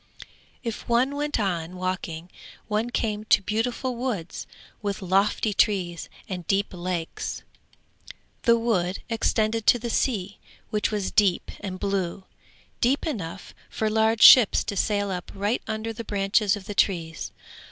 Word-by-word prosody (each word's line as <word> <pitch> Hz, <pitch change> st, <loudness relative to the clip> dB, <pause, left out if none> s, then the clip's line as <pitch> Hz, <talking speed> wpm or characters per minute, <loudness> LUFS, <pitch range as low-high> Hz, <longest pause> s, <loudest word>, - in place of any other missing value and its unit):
If 230 Hz, 0 st, -5 dB
one 250 Hz, +4 st, +2 dB
went 295 Hz, -2 st, -1 dB
on 180 Hz, -4 st, -2 dB
walking, 180 Hz, -2 st, -4 dB, 0.4 s
one 215 Hz, +2 st, 0 dB
came 215 Hz, -3 st, -1 dB
to -, -, +5 dB
beautiful 240 Hz, +5 st, -1 dB
woods 235 Hz, -9 st, -4 dB, 0.3 s
with 200 Hz, -1 st, -2 dB
lofty 195 Hz, +3 st, +2 dB
trees 185 Hz, -5 st, +1 dB, 0.2 s
and 180 Hz, -3 st, -6 dB
deep 200 Hz, 0 st, +1 dB
lakes. 175 Hz, -2 st, -4 dB, 1.0 s
The 235 Hz, -1 st, +4 dB
wood 195 Hz, -6 st, 0 dB
extended 225 Hz, -1 st, 0 dB
to -, -, +7 dB
the 235 Hz, 0 st, -4 dB
sea, 205 Hz, -7 st, -1 dB, 0.3 s
which 210 Hz, -1 st, +1 dB
was 205 Hz, -3 st, -2 dB
deep 205 Hz, -4 st, +2 dB
and 185 Hz, -2 st, -6 dB
blue, 195 Hz, -2 st, -2 dB, 0.6 s
deep 260 Hz, +4 st, +2 dB
enough 195 Hz, -, -5 dB, 0.2 s
for 220 Hz, -1 st, -1 dB
large 220 Hz, +1 st, +3 dB
ships 245 Hz, -6 st, +9 dB
to 200 Hz, -, -4 dB
sail 205 Hz, 0 st, 0 dB
up 180 Hz, -1 st, -5 dB
right 205 Hz, +4 st, 0 dB
under 220 Hz, +1 st, -3 dB
the 230 Hz, -, -6 dB
branches 205 Hz, 0 st, +1 dB
of 200 Hz, -2 st, -9 dB
the 205 Hz, -, -5 dB
trees. 170 Hz, -4 st, 0 dB
205 Hz, 140 wpm, -25 LUFS, 185-225 Hz, 1.0 s, ships